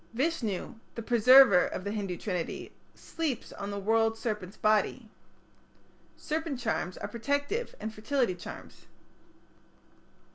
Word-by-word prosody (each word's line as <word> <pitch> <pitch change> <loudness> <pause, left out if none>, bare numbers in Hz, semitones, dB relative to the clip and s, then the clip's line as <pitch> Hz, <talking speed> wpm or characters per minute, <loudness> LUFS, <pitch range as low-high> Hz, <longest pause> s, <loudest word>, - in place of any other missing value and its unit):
Vishnu, 245 - -1 0.2
the 230 - -5
Preserver 240 -3 +7
of - - -5
the 200 - -3
Hindu 195 -4 -3
Trinity, 180 -4 -4 0.2
sleeps 310 -8 -4
on 200 - -6
the 200 - -4
world 225 +2 +2
serpent's 210 -4 -4
body. 215 +2 +1 1.1
Serpent 315 -3 -3
charms 225 -6 -2
are - - -4
protective 285 - -2
and 220 +1 -5
fertility 235 -1 0
charms. 175 - -11
225 Hz, 115 wpm, -29 LUFS, 200-265 Hz, 1.1 s, Preserver